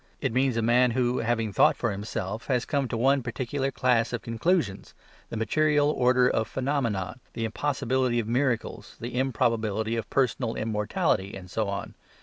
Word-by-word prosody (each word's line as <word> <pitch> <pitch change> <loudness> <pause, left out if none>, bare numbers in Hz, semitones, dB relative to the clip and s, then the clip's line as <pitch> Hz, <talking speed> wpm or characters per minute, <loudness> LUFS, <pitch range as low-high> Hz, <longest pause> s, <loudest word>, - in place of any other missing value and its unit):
It 130 -5 -1
means 130 -1 +2
a 115 - +1
man 125 +2 +4
who, 125 0 +1
having 115 -2 -1
thought - - +5
for 115 - 0
himself, 105 +2 -4
has 125 -2 +1
come 140 -3 0
to 120 - -3
one 135 +3 +3
particular 130 +3 -2
class 125 -3 +1
of 120 - -4
conclusions, 115 - -1 0.3
the 115 - -5
material 150 +5 +2
origin 125 -1 +3
of 110 - 0
phenomena, 125 -7 -2 0.2
the 115 - -2
impossibility 130 0 0
of 115 -2 -1
miracles, 120 -4 -1
the 120 +2 -6
improbability 115 -4 0
of 115 -2 -4
personal 125 -3 0
immortality 105 -3 -1
and 90 -1 -11
so 110 -1 -1
on. 100 0 -4
120 Hz, 165 wpm, -27 LUFS, 110-130 Hz, 0.3 s, thought